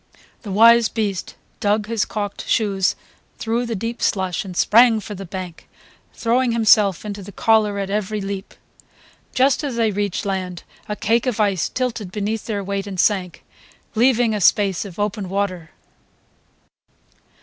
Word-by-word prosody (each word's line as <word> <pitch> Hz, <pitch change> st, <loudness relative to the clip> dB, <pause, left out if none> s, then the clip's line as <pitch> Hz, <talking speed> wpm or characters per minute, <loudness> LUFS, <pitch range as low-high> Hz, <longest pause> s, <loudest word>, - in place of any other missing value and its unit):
The 210 Hz, -, -7 dB
wise 230 Hz, +3 st, +6 dB
beast 205 Hz, -5 st, -3 dB, 0.2 s
dug 210 Hz, +1 st, +1 dB
his 225 Hz, -1 st, -1 dB
calked 205 Hz, -2 st, -5 dB
shoes 195 Hz, -4 st, +1 dB, 0.4 s
through 235 Hz, +2 st, -1 dB
the 230 Hz, -, -2 dB
deep 230 Hz, +4 st, -4 dB
slush 190 Hz, -4 st, 0 dB
and 185 Hz, -3 st, -8 dB
sprang 230 Hz, 0 st, +5 dB
for 210 Hz, 0 st, -7 dB
the 195 Hz, -1 st, -8 dB
bank, 180 Hz, -2 st, -8 dB, 0.5 s
throwing 240 Hz, +1 st, +1 dB
himself 215 Hz, -4 st, +4 dB
into 205 Hz, -1 st, -5 dB
the 200 Hz, +1 st, -10 dB
collar 215 Hz, 0 st, +2 dB
at 195 Hz, -1 st, -3 dB
every 210 Hz, +1 st, -1 dB
leap. 195 Hz, 0 st, -6 dB, 0.8 s
Just 265 Hz, +3 st, +3 dB
as 275 Hz, -4 st, -3 dB
they 225 Hz, -2 st, +1 dB
reached 205 Hz, -1 st, -2 dB
land 185 Hz, -3 st, -3 dB, 0.3 s
a 210 Hz, -, -2 dB
cake 230 Hz, +3 st, +1 dB
of 240 Hz, -3 st, -1 dB
ice 200 Hz, -6 st, +1 dB
tilted 235 Hz, -7 st, -3 dB
beneath 210 Hz, +2 st, -3 dB
their 205 Hz, -3 st, -2 dB
weight 200 Hz, +1 st, -3 dB
and 190 Hz, -2 st, -6 dB
sank, 185 Hz, -4 st, 0 dB, 0.5 s
leaving 240 Hz, -1 st, +3 dB
a 210 Hz, -, -2 dB
space 195 Hz, +1 st, +3 dB
of 185 Hz, -4 st, -10 dB
open 205 Hz, -2 st, -2 dB
water. 185 Hz, -4 st, -2 dB
205 Hz, 155 wpm, -21 LUFS, 195-225 Hz, 0.8 s, wise